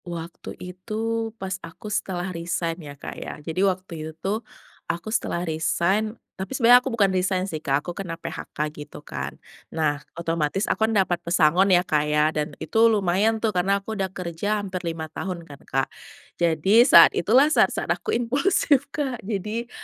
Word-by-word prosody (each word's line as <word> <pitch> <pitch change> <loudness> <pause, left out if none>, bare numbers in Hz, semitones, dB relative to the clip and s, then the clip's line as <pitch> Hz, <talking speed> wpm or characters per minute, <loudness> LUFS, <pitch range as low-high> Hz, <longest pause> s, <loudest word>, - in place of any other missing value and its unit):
Waktu 170 -1 -7
itu, 220 +5 -3
pas 190 -1 -5
aku 165 +5 -12
setelah 185 -3 -2
resign 170 0 -3
ya, 145 -2 -10
Kak, - - -7
ya. - - -6
Jadi 165 +3 -2
waktu 185 -1 0
itu 155 +1 -5
tuh, 200 +6 -2 0.5
aku 170 +6 -3
setelah 175 -6 -1
resign 185 +7 0 0.2
tapi 195 +8 -4
sebenarnya 245 0 +7
aku 265 - -3
bukan 200 -3 +3
resign 185 0 +1
sih, 160 -5 -5
Kak, 140 0 0
aku 175 - -4
kena 170 -3 -5
PHK 150 -2 -5
gitu 150 -1 -10
kan. 70 0 -5 0.3
Nah, 150 -2 0 0.2
otomatis 165 +2 -1
aku 220 0 +1
kan - - -1
dapat 180 -3 +1
pesangon 175 +2 +3
ya, 180 -1 +4
Kak, 150 -3 +2
ya, 150 +1 +3
dan 150 -1 -3
itu 225 +1 +3
lumayan 205 +1 +2
tuh, 220 -1 -1
karena 190 +2 +2
aku 200 +2 -6
udah 195 -3 -2
kerja 180 +3 -2
hampir 190 -3 -4
5 165 -2 -4
tahun 180 -3 -5
kan, 145 -3 -13
Kak. 135 0 +1 0.5
Jadi 170 +7 +4
saat 170 - +9
itulah 245 - +4
saat-saat - - +2
aku - - -8
impulsif, 280 +3 +2
Kak. 275 -5 -3
Jadi 215 +3 -3
185 Hz, 175 wpm, -24 LUFS, 165-215 Hz, 0.5 s, saat